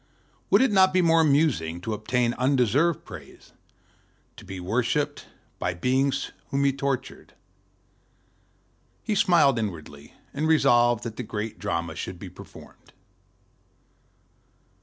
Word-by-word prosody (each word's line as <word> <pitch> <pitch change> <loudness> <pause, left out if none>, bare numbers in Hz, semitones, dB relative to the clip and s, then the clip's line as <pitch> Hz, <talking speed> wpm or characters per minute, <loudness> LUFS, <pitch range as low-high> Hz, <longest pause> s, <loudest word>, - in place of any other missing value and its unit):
Would - - +5
it 265 - +2
not 190 -2 +4
be 185 -1 +3
more 165 -1 +4
amusing 140 - +1
to 110 +4 -3
obtain 120 +3 0
undeserved 135 +5 +1
praise, - - -13 0.8
to - - -13
be 95 -1 -8
worshiped 125 +10 -1 0.3
by 90 0 -2
beings 135 +7 0 0.2
whom 140 0 0
he 140 -1 +3
tortured? 135 -1 -4 1.7
He 215 - -1
smiled 175 - +4
inwardly, 80 -8 -7 0.2
and 150 +3 -1
resolved 120 -7 +3
that 115 -2 -6
the - - -3
great 110 -1 -5
drama 85 -1 -3
should 90 +2 -6
be 95 +1 -9
performed. - - -15
125 Hz, 120 wpm, -25 LUFS, 105-150 Hz, 1.7 s, Would